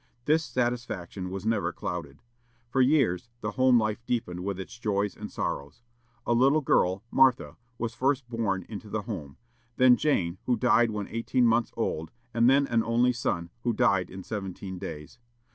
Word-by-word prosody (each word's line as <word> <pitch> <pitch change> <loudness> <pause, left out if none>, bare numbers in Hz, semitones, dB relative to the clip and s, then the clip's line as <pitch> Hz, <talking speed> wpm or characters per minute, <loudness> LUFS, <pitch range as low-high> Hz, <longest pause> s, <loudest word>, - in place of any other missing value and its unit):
This 155 +2 +3
satisfaction 115 - -3
was 95 +2 -6
never 110 -6 +1
clouded. 80 -4 -6 0.5
For 135 - +3
years, 125 - +2
the 105 - -2
home 130 -1 +4
life 110 +1 -2
deepened 90 -7 -2
with 100 -1 -3
its 95 +5 -8
joys 105 -2 -1
and - - -7
sorrows. 70 +11 -4 0.4
A 120 - +2
little 135 +6 +4
girl, 95 -7 +2
Martha, 130 -1 +3 0.2
was 115 0 -3
first 135 0 0
born 105 -6 -2
into 105 -1 -8
the 105 0 -3
home; 80 - -6 0.4
then 125 -1 +7
Jane, 95 - 0
who 125 -2 +2
died 120 0 +4
when 105 -2 -4
eighteen 120 +2 +1
months 115 0 +2
old, 80 +1 -2 0.2
and 115 +1 +4
then 140 +1 +4
an 115 -3 +1
only 120 +2 +2
son, 85 -8 -2
who 120 0 0
died 100 -3 +2
in 95 0 -8
seventeen 95 -2 -6
days. 80 +3 -8
110 Hz, 170 wpm, -28 LUFS, 95-125 Hz, 0.5 s, then